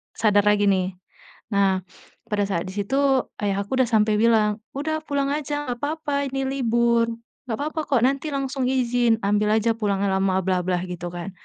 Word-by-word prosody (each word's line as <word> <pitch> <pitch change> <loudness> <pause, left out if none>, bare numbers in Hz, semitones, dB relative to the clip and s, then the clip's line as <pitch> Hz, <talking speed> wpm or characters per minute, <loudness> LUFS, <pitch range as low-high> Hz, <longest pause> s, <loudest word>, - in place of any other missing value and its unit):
sadar 205 -2 +3
lagi 205 -1 +4
nih. 185 0 0 0.6
Nah 195 -2 +2 0.5
pada 205 -1 +1
saat 170 -4 -1
di 185 - -6
situ 205 +6 -2 0.5
ayah 200 -1 0
aku 230 +7 -3
udah 235 - -3
sampai 215 -1 +3
bilang, 215 -2 +3 0.2
"Udah 315 +2 -1
pulang 280 -2 -1
aja 295 -1 -3
nggak 245 -1 -3
apa-apa 290 -2 -1
ini 270 0 -2
libur, 235 -3 +2 0.4
nggak 225 -3 -2
apa-apa 305 +3 -3
kok 260 -4 +4
nanti 275 +3 -2
langsung 270 -1 -2
izin 245 -3 +2
ambil 210 +1 +2
aja 225 +1 +1
pulangnya 200 -3 0
lama, 190 -1 +1
bla 185 -1 +2
bla," 180 -1 0
gitu 175 -1 -6
kan, 175 +2 -6
225 Hz, 180 wpm, -23 LUFS, 200-270 Hz, 0.6 s, lagi